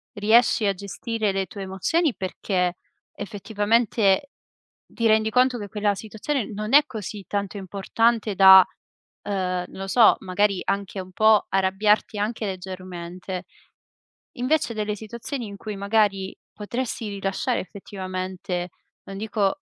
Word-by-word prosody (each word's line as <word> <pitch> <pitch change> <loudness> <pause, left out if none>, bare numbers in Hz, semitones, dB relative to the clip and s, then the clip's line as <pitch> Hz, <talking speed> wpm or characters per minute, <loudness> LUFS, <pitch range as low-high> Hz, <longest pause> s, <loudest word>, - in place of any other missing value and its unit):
riesci 220 +2 +4
a 200 - +2
gestire 210 +3 -3
le 195 0 -1
tue 200 - -9
emozioni. 215 - 0
Perché 185 -2 -2 0.4
effettivamente, 210 +3 +1 0.5
ti 230 -1 -1
rendi 220 0 +3
conto 250 +2 +3
che 205 -3 -7
quella 205 0 0
situazione 220 +4 -3
non 215 +3 -4
è 290 +1 +8
così 215 -5 -7
tanto 200 0 -3
importante 205 +3 0
da, 190 -1 +9 0.6
uhm, 205 - -3 0.4
non - - -11
lo 195 - -4
so, 225 +2 +6
magari 195 +1 +1
anche 200 0 -2
un 185 0 -8
po' 215 +1 +4
arrabbiarti 195 +3 +1
anche 215 +2 -2
leggermente. 185 -1 -6 0.9
Invece 255 -1 0
delle 210 -1 -2
situazioni 235 +4 -6
in 200 -1 -8
cui 210 +1 -6
magari 200 -1 +1 0.2
potresti 230 +1 -4
rilasciare 195 -1 -2
effettivamente, 185 -2 -5 0.4
non 195 - -8
dico, 210 +3 -1
205 Hz, 130 wpm, -24 LUFS, 190-220 Hz, 0.9 s, da